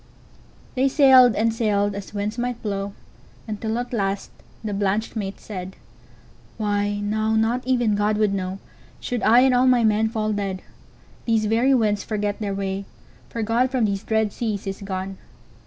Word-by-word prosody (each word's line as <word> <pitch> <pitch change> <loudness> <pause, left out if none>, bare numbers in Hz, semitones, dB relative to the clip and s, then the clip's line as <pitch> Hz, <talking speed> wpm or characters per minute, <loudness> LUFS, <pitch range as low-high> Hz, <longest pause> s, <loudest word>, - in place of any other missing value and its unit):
'"They 265 +1 +2
sailed 260 -4 +6
and 225 +1 +1
sailed, 205 -3 +1
as 200 0 -7
winds 210 +3 -3
might 245 -1 -2
blow, 200 -1 -3 0.5
Until 220 +1 -3
at 245 +1 -4
last 195 -3 -2 0.3
the 210 -2 -3
blanched 200 +3 -1
mate 195 -3 -4
said:"Why, 205 +1 -6
now 215 +1 0
not 225 +3 +1
even 240 -4 +2
God 210 +1 +1
would 210 -2 +2
knowShould 195 +5 -6
I 235 +3 +6
and 260 0 +4
all 250 +1 +4
my 250 -2 +4
men 220 0 +3
fall 215 -1 -1
dead. 195 -2 -3 0.6
These 225 -2 +2
very 235 +5 +3
winds 210 -4 +1
forget 205 -1 -2
their 200 -2 -2
way, 195 0 -3 0.4
For 230 - -3
God 235 +4 +2
from 255 -3 +1
these 200 -2 -1
dread 220 -2 0
seas 215 -4 -3
is 195 0 -5
gone. 190 -1 -5
215 Hz, 160 wpm, -23 LUFS, 200-230 Hz, 0.6 s, sailed